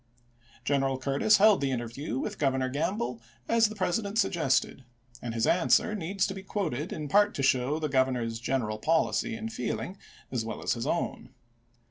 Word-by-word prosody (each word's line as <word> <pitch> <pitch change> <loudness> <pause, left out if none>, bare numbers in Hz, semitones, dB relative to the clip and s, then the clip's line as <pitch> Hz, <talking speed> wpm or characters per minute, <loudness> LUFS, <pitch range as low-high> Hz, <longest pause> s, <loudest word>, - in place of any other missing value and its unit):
General 135 -2 +1
Cui'tis 140 +11 +3
held 210 -3 +5
the 140 - +1
interview 120 +1 -3
with - - -4
Governor 130 -2 +1
Gamble 130 - -2 0.3
as 230 -1 +4
the 215 - -8
President 200 +2 -1
suggested, 150 - +1 0.4
and 120 -1 -5
his 115 - +1
answer 180 +4 +3
needs 195 0 -1
to 195 - -3
be 190 - -7
quoted 175 -7 -3
in 150 -1 -4
part 205 +7 +3
to 135 - -2
show 130 +2 +2
the 155 -1 -1
Governor's 130 -4 0
general 115 -3 -1
policy 165 - +1
and 225 0 -6
feeling 190 -2 -3 0.3
as 125 -3 -1
well 110 -1 -6
as - - +1
his 115 -2 -4
own. 135 -6 -3
140 Hz, 170 wpm, -28 LUFS, 130-195 Hz, 0.4 s, held